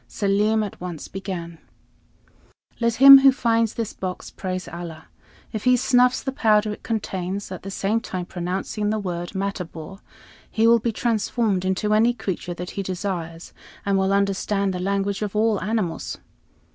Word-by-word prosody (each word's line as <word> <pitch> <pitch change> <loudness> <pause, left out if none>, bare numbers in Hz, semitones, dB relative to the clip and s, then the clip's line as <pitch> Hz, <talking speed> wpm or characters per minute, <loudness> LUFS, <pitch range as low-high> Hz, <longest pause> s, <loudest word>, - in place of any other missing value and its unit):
Selim 210 +2 +1
at 205 - -7
once 175 -4 -6
began: 175 -4 -6 1.2
"Let 235 -1 +1
him 275 +2 +11
who 270 0 +7
finds 230 -4 +1
this 230 -3 -3
box 185 -1 -6
praise 185 -1 -5
Allah. 170 -2 -8 0.5
If 215 - -4
he 250 0 +5
snuffs 250 0 +3
the 265 - -2
powder 215 -4 +2
it - - -11
contains, 195 -3 -3
at 185 - -6
the 195 - -7
same 200 +3 0
time 185 -6 -5
pronouncing 190 +4 -3
the 215 - 0
word 175 -2 -4
'Matabor,' 190 -2 -5 0.5
he 225 - +1
will 235 0 +6
be 230 +1 -1
transformed 220 -3 0
into 190 +3 0
any 230 +3 +3
creature 185 -5 -4
that 180 +1 -6
he 200 - -4
desires, 175 -3 -5 0.3
and 200 -1 +1
will 190 0 +2
understand 200 0 0
the 180 - -4
language 195 +1 -1
of 210 -1 -3
all 215 -1 +2
animals. 210 -4 -2
200 Hz, 160 wpm, -23 LUFS, 185-220 Hz, 1.2 s, him